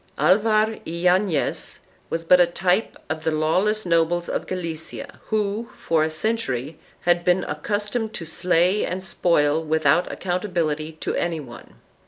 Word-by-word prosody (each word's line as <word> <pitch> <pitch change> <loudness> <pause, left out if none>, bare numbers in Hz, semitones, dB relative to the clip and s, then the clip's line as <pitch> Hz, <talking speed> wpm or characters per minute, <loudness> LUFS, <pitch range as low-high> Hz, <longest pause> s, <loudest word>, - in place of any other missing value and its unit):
Alvar 215 +7 +3
Yanez 180 0 0 0.3
was 165 0 -3
but 180 +2 +6
a 175 - +5
type 180 +4 0
of 160 +1 -4
the - - +1
law 155 +2 +2
* - - +2
less 215 0 0
nobles 170 0 +2
of - - -3
Galicia 175 - -6
who, 215 +1 -1
for 165 -2 +1
a 155 - +2
century, 155 - -2 0.2
had 175 0 +2
been 180 +1 +3
accustomed 215 +1 -2
to 165 - -5
slay 180 +4 +2
and 185 +1 -3
spoil 160 -5 +2
without 155 +1 +2
accountability 170 -5 -2
to 155 - -4
any 170 -2 -1
one. 120 -5 -11
175 Hz, 150 wpm, -23 LUFS, 160-200 Hz, 0.3 s, but